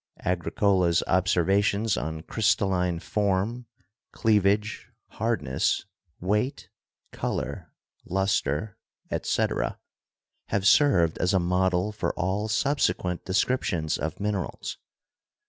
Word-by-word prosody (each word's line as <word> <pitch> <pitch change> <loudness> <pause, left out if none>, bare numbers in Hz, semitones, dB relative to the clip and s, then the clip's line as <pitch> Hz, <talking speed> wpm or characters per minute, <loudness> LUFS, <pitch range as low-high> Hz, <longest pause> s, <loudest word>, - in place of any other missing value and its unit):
Agricola's 90 0 +2
observations 100 +4 +2
on 80 +1 -4
crystalline 95 -5 +1
form, 105 +5 -1 0.4
cleavage, 105 0 +1 0.2
hardness, 110 - 0 0.3
weight, 105 +8 -1 0.4
color, - - -4 0.4
luster, 95 -1 -1 0.3
etc., - - -1 0.7
have 100 -1 -1
served 95 - +4
as 90 +3 +2
a - - +4
model 90 +2 +1
for 105 - -2
all 95 +4 -1
subsequent 105 -7 0
descriptions 95 -5 0
of 80 +3 -4
min 105 +1 0
erals. 95 -3 -4
95 Hz, 90 wpm, -26 LUFS, 90-105 Hz, 0.7 s, served